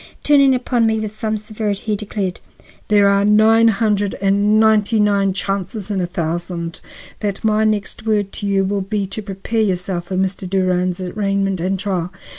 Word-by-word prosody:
Turning 275 -3 +5
upon 245 -2 +1
me 220 0 +1
with 215 -1 -4
some 215 0 -2
severity, 210 -1 -4
he 215 -1 -1
declared: 200 -3 -4 0.5
"There 205 -1 +4
are 200 0 +3
nine 220 +2 +5
hundred 210 -2 +1
and 200 +2 +2
ninety 220 0 +3
nine 200 -2 +2
chances 195 +2 -3
in 195 -2 -1
a 175 - -1
thousand 170 0 -4 0.4
that 205 -1 -3
my 215 0 +2
next 215 -1 -2
word 205 -2 +1
to 205 - -4
you 195 -1 +2
will 200 +1 -1
be 200 +1 -2
to 195 +3 -6
prepare 200 +3 -3
yourself 180 -3 -1
for 185 - -5
Mr. 190 0 -2
Durand's 185 -1 0
arraignment 195 -1 -1
and 190 +2 0
trial. 185 -4 -2
200 Hz, 175 wpm, -19 LUFS, 190-215 Hz, 0.5 s, Turning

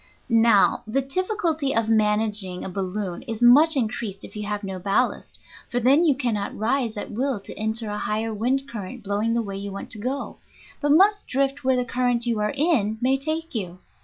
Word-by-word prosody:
Now, 225 -4 +4
the 270 +5 0
difficulty 325 - -1
of 225 -1 +1
managing 210 -3 +1
a - - -4
balloon 190 0 -4
is 225 -2 -4
much 285 +7 +7
increased 220 -5 -3
if - - -13
you 210 -1 -4
have 210 0 -3
no 190 -1 -5
ballast, 200 +7 -1 0.3
for 245 - 0
then 270 +7 +4
you 300 -5 +4
cannot 225 -7 -2
rise 235 0 0
at - - -5
will 255 +1 -1
to - - -9
enter 220 +1 -3
a 210 - -3
higher 220 +2 -2
wind 260 +6 0
current 230 +2 -7
blowing 210 +3 0
the 235 - +1
way 195 -2 -5
you 200 0 -5
want 195 - -7
to 220 - -4
go, 260 +5 -4 0.4
but 290 - 0
must 400 +7 +4
drift 275 +2 -1
where 260 0 +3
the 250 0 0
current 245 -1 0
you 230 -3 0
are 210 0 0
in 260 -9 +2
may 255 +2 +2
take 315 +4 -3
you. 185 -6 -4
230 Hz, 200 wpm, -24 LUFS, 210-270 Hz, 0.4 s, much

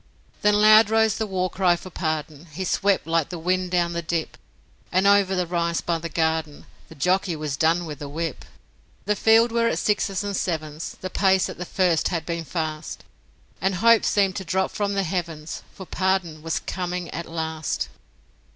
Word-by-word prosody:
Then 210 0 +4
loud 215 0 +7
rose 220 -1 +2
the 220 - -1
war 185 -2 0
cry 185 -1 +2
for 180 +2 -10
Pardon; 155 -1 -3
He 185 +6 -4
swept 195 +2 +1
like 165 -1 0
the 175 - -5
wind 180 +2 0
down 175 -1 +1
the 170 - -2
dip, 165 -1 -3 0.6
And 185 +2 +2
over 200 -1 +4
the 180 -1 0
rise 170 -1 -1
by 170 -1 -1
the 170 +1 -5
garden, 160 -2 -1 0.2
The - - -12
jockey 180 +3 +1
was 150 -2 -3
done 165 +4 +2
with 150 -3 -7
the 145 - -6
whip 160 +1 -4 0.6
The 210 +1 +1
field 225 +3 +4
were 230 0 +2
at - - 0
sixes 205 -1 0
and 200 -1 -3
sevens 155 -3 -3
The 185 - -5
pace 190 -1 +3
at - - -8
the 180 - -4
first 175 -3 +1
had 165 -3 -2
been 170 -1 -3
fast 155 -2 -4 0.6
And 190 0 +1
hope 230 +4 +5
seemed 195 -2 +2
to 190 - -4
drop 190 +2 0
from 205 -1 -2
the 195 - +1
heavens, 165 -3 -4
For 190 - -10
Pardon 185 -4 -1
was 165 +1 -2
coming 180 -1 -4
at 170 +2 -5
last. 160 -1 -3
180 Hz, 190 wpm, -24 LUFS, 160-195 Hz, 0.6 s, loud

